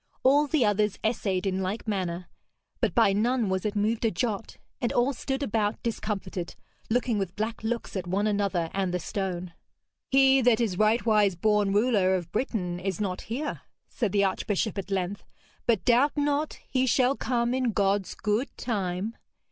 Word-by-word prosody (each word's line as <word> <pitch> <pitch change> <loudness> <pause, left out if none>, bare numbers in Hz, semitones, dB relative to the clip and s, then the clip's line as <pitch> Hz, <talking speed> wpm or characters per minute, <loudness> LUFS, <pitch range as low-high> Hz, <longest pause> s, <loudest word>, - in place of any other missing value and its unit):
All 285 +3 +5
the 285 -4 +2
others 210 -1 +1
essayed 200 -4 0
in 190 0 0
like 195 +5 -3
manner, 180 -4 -2 0.5
but - - 0
by 225 -5 +5
none 230 +1 +1
was 190 +2 0
it 210 - -4
moved 215 +3 0
a 225 - +4
jot, 215 +2 -3 0.2
and 240 - 0
all 250 +3 +2
stood 270 +2 -3
about 210 -3 -1
discomfited, 195 -6 -3 0.3
looking 235 -1 +1
with 190 -2 -3
black 220 +1 -3
looks 235 0 -3
at 185 -2 -3
one 195 +4 0
another 200 -5 0
and 190 -2 0
the 180 - -1
stone. 180 -1 -4 0.6
'He 270 -1 +5
that 245 -2 +4
is 220 -6 0
rightwise 215 -1 +3
born 210 0 +2
ruler 205 -3 +3
of 175 -2 -4
Britain 185 -8 -2
is 190 -1 -3
not 190 -3 -2
here,' 280 +7 -3 0.3
said 225 -6 -1
the 200 0 +3
archbishop 200 +2 -1
at 195 - -6
length, 195 0 -2 0.4
'but 225 -5 +2
doubt 255 +5 +4
not 290 +1 0
he 260 0 +1
shall 255 +2 +3
come 240 -2 0
in 255 -2 +1
God's 200 -2 0
good 215 +6 0
time. 200 -1 -2
210 Hz, 170 wpm, -27 LUFS, 190-240 Hz, 0.6 s, All